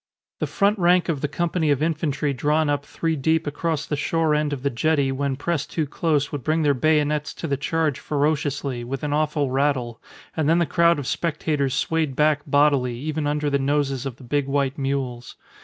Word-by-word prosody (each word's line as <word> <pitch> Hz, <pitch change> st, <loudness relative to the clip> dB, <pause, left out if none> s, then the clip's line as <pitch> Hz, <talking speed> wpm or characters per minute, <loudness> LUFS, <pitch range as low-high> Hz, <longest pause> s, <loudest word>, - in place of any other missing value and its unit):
The -, -, -1 dB
front 200 Hz, +1 st, +1 dB
rank 175 Hz, 0 st, +3 dB
of 150 Hz, -5 st, -1 dB
the 150 Hz, -, 0 dB
company 165 Hz, +1 st, -1 dB
of 145 Hz, 0 st, +2 dB
infantry 150 Hz, -3 st, -1 dB
drawn 150 Hz, +3 st, +1 dB
up 145 Hz, 0 st, -2 dB
three 165 Hz, -1 st, -1 dB
deep 160 Hz, +3 st, +1 dB
across 155 Hz, +1 st, -2 dB
the 150 Hz, -, -2 dB
shore 160 Hz, +1 st, +1 dB
end 150 Hz, 0 st, +1 dB
of 135 Hz, -3 st, -4 dB
the 140 Hz, -, +1 dB
jetty 140 Hz, +2 st, +1 dB
when 135 Hz, 0 st, -1 dB
pressed 160 Hz, +2 st, -2 dB
too 160 Hz, -, 0 dB
close 145 Hz, -1 st, 0 dB
would 145 Hz, -4 st, -5 dB
bring 155 Hz, +1 st, +1 dB
their 145 Hz, -1 st, +4 dB
bayonets 150 Hz, +1 st, +1 dB
to -, -, -6 dB
the 140 Hz, -, 0 dB
charge 155 Hz, 0 st, -1 dB
ferociously, 145 Hz, -3 st, -1 dB
with 130 Hz, +3 st, -5 dB
an 145 Hz, -1 st, -1 dB
awful 150 Hz, -2 st, 0 dB
rattle; 130 Hz, -4 st, 0 dB, 0.3 s
and 155 Hz, -2 st, +1 dB
then 165 Hz, -, +4 dB
the 170 Hz, -, +3 dB
crowd 170 Hz, -1 st, +3 dB
of 145 Hz, -, -4 dB
spectators 150 Hz, -3 st, -1 dB
swayed 160 Hz, -4 st, 0 dB
back 150 Hz, 0 st, +3 dB
bodily, 140 Hz, -4 st, +2 dB
even 155 Hz, +2 st, -2 dB
under 150 Hz, 0 st, -1 dB
the 140 Hz, -1 st, +1 dB
noses 140 Hz, -1 st, 0 dB
of 130 Hz, -, -6 dB
the 130 Hz, -, -15 dB
big 140 Hz, +2 st, -1 dB
white 140 Hz, -1 st, 0 dB
mules. 135 Hz, -3 st, -3 dB
145 Hz, 205 wpm, -23 LUFS, 140-155 Hz, 0.3 s, their